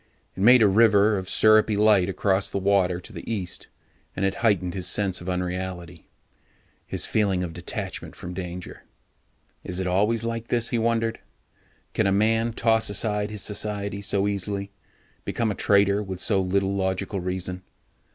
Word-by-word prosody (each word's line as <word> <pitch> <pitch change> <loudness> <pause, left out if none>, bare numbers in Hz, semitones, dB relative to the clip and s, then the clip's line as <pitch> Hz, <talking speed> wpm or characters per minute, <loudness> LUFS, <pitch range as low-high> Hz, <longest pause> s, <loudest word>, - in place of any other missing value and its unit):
It 95 - -6
made 120 +2 +7
a - - +6
river 105 0 +4
of 95 -1 -4
syrupy 110 -1 +4
light 105 -3 +4
across 95 +1 0
the - - -3
water 95 -2 +1
to 90 - -11
the - - -7
east, 95 -6 -4 0.5
and 95 - -1
it 95 - +1
heightened 95 -6 +1
his 90 -3 -3
sense 95 -1 0
of 90 - -6
unreality, 90 -2 -4 0.8
his - - -1
feeling 100 -4 +1
of 85 -2 -5
detachment - - -6
from 90 - -8
danger. 90 -1 -7 0.8
Is 90 0 -3
it 95 - -2
always 105 +5 +1
like 115 0 -4
this, 120 -1 0
he 120 - 0
wondered? 115 0 0 0.7
Can - - +1
a - - +2
man 110 +3 +2
toss 115 -1 +2
aside 105 0 0
his 105 -3 -5
society 100 -1 -2
so 100 0 0
easily, 100 0 -3 0.5
become 115 -2 -1
a - - -1
traitor 100 +1 +2
with 95 -3 -6
so 100 -2 +2
little 95 +1 0
logical 95 +1 -2
reason? 90 0 -4
100 Hz, 165 wpm, -24 LUFS, 95-110 Hz, 0.8 s, made